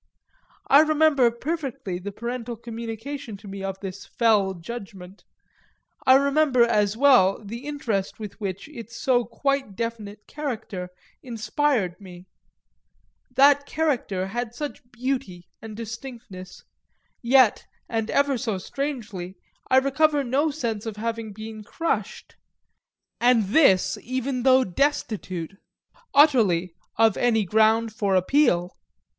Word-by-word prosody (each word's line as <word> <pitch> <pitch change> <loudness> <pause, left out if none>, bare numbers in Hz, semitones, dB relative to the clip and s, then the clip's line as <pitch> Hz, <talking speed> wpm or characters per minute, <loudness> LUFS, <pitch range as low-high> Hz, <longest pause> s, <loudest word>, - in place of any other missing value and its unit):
I 280 - +7
remember 310 -4 +4
perfectly 265 - -4
the 200 +3 -6
parental 235 +2 -5
communication 230 +2 -7
to 205 - -14
me 195 0 -7
of 195 0 -4
this 195 -1 -7
fell 210 -5 +2
judgment, 195 0 -9 0.8
I 260 - +8
remember 280 -2 +3
as 210 -3 +1
well 250 -8 +5
the 235 +7 -7
interest 225 -11 -3
with 210 0 -8
which 195 +1 -4
its 235 -5 -10
so 245 -2 +2
quite 275 -7 -2
definite 220 -2 -5
character 220 -11 -5 0.3
inspired 225 -4 -1
me 180 -2 -12 1.1
that 285 +1 +5
character 275 -12 -1
had 235 +3 -4
such 295 +2 -5
beauty 245 -8 -4
and 220 -1 -9
distinctness; 225 -5 -9 0.6
yet, 250 -2 +4 0.2
and 225 -1 -2
ever 280 -3 +1
so 225 -6 -2
strangely, 215 -6 -5 0.3
I 260 - +5
recover 285 +2 +3
no 275 +5 +1
sense 235 -7 -3
of 220 - -4
having 225 0 -4
been 215 +1 -8
crushed, 330 +10 -3 0.8
and 235 -5 +3
this 205 - +4
even 255 +1 -3
though 260 +1 +5
destitute, 195 - -2 0.5
utterly, 210 - +4 0.2
of 225 -2 +4
any 225 -4 +2
ground 220 +3 +3
of 195 -2 +2
appeal. 185 -3 +2
230 Hz, 120 wpm, -24 LUFS, 200-270 Hz, 1.1 s, I